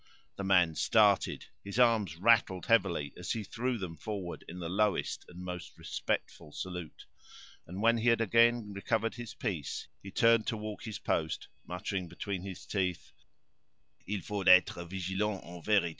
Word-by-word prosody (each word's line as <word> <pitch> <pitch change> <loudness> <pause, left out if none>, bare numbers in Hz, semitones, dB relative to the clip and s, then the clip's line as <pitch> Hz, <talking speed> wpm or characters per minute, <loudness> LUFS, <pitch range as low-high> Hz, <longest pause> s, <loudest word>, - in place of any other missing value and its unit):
The 100 - -5
man 90 -4 +4
started; 105 +3 +3 0.2
his 100 +2 -6
arms 115 -8 +3
rattled 95 -2 +3
heavily 95 - +2
as 90 - -3
he 110 - -3
threw 120 +4 -2
them 90 -5 -5
forward 95 0 -5
in 90 - -8
the 85 -2 -4
lowest 100 +3 0
and 90 - -12
most 90 -1 -7
respectful 75 - -3
salute; 90 -1 -7 0.6
and 95 +5 -5
when 115 0 +4
he 120 +2 +3
had 115 - +4
again 115 -1 +3
recovered 115 +3 0
his 120 -3 -8
piece, 90 - -4
he 100 - -9
turned 115 +2 +4
to 110 - -1
walk 105 +1 -6
his 110 -2 -4
post, 80 -6 -2 0.2
muttering 90 +1 -3
between 90 +2 -4
his 95 0 -8
teeth: 90 -3 -2 1.0
"Il 100 0 -2
faut 100 -1 -3
être 90 -1 +6
vigilant, 95 +2 -1
en 85 0 -10
vérité! 100 -2 +3
100 Hz, 160 wpm, -31 LUFS, 90-110 Hz, 1.0 s, être